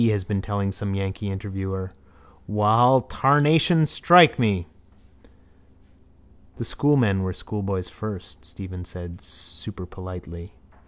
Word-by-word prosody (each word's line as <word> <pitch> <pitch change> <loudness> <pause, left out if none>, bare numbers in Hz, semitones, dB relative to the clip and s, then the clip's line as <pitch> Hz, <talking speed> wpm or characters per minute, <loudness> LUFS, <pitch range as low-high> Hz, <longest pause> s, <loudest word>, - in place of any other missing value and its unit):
has 105 -3 0
been 100 +1 -2
telling 100 -1 -2
some 100 0 -4
yankee 100 +1 -4
interviewer. 95 -1 -5 0.6
Wall, 115 +5 +4
tarnation 150 +6 +3
strike 170 +1 +6
me! 100 -7 +1 1.9
—The - - -4
schoolmen 125 -10 +2
were 95 -1 -2
schoolboys 95 -3 -4
first, 105 -4 -8
Stephen 95 -2 -9
said 90 -1 -9
superpolitely. 90 -1 -9
100 Hz, 100 wpm, -24 LUFS, 95-115 Hz, 1.9 s, strike